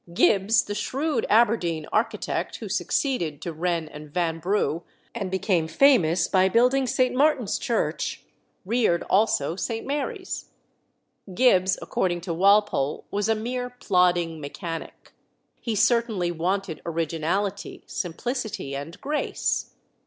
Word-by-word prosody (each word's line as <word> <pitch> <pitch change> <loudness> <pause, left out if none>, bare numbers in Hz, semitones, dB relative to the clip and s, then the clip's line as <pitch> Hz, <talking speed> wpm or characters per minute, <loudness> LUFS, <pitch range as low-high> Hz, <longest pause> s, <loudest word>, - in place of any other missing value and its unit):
Gibbs, 200 +4 +4
the 205 - -5
shrewd 270 +3 -1
Aberdeen 205 -8 +2
architect, 215 +2 -1
who - - -7
succeeded 170 - -1
to 170 - -4
Wren 170 0 -1
and 150 -1 -11
Vanbrugh, 170 +1 0 0.3
and 200 -5 -3
became 185 -3 0
famous 175 - +4
by 190 0 +3
building 250 +5 +3
St. 255 +1 +1
Martin's 270 -5 +2
Church, 235 - -2 0.4
reared 215 -5 +1
also 190 -7 +2
St. 225 +3 -3
Mary's. 360 - -3 0.9
Gibbs, 190 -6 +4
according 175 -2 -1
to 170 -1 -3
Walpole, 195 -6 +2
was 205 +1 -1
a 225 - +3
mere 245 +3 -3
plodding 180 -8 +1
mechanic. 165 +3 -7 0.5
He 230 -3 -3
certainly 220 -5 +2
wanted 180 +1 -2
originality, 170 +5 -2
simplicity, 210 - -4
and 160 +7 -7
grace. 300 +1 -2
195 Hz, 115 wpm, -25 LUFS, 170-235 Hz, 0.9 s, Gibbs